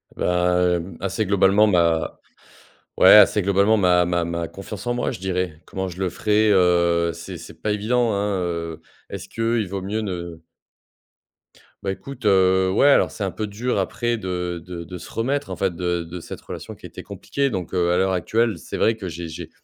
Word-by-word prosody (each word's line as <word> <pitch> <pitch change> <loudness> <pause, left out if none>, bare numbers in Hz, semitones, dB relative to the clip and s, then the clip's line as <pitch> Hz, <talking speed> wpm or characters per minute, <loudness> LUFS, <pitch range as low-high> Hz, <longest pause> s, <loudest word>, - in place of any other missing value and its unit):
Ben, - - -1 0.5
hem, 85 0 -6
assez, 100 +3 -1
globalement, 100 +2 +4
ma 85 -4 +1 0.8
ouais, - - +7
assez 105 0 +7
globalement 100 +3 +3
ma 90 -2 +4
ma 85 -1 0
ma 85 0 -3
confiance 100 +4 -9
en 120 - +1
moi, 120 - -1
je - - -6
dirais. 90 -4 -3
Comment 95 0 -4
je 90 0 -9
le 95 -2 -1
ferai, 105 +3 +2
heu, 85 -2 +3
c'est 85 0 -8
c'est - - -12
pas 105 - 0
évident, 115 +2 +1
hein, 100 0 -1
heu, 85 -2 -4 0.3
est-ce - - -7
qu'il 115 -1 0
vaut 95 0 -4
mieux 105 +4 -3
ne 85 -5 -6 1.4
Bah, 95 - -1
écoute, 130 +4 -9
heu, 95 -1 +4
ouais 105 +9 +4
alors, 140 - +4
c'est 105 - -6
un 95 - -1
peu 110 - -4
dur 115 +5 -2
après 120 -1 -1
de 90 -3 -4
de 90 -2 -7
de 90 +2 -8
se 85 - -11
remettre 140 +5 -2
en - - -4
fait 95 -3 -1
de 90 -1 -1
de 85 +2 -8
cette - - -9
relation, - - -8
qui - - -14
était - - -9
compliquée 140 -1 -2
donc, 95 -6 -5
heu, 85 -1 +2
à 90 - +2
l'heure 95 0 +2
actuelle, 110 +3 0
c'est - - -8
vrai 115 0 +2
que 95 -4 -6
j'ai 85 0 -6
j'ai 80 - -8
95 Hz, 200 wpm, -22 LUFS, 85-105 Hz, 1.4 s, ouais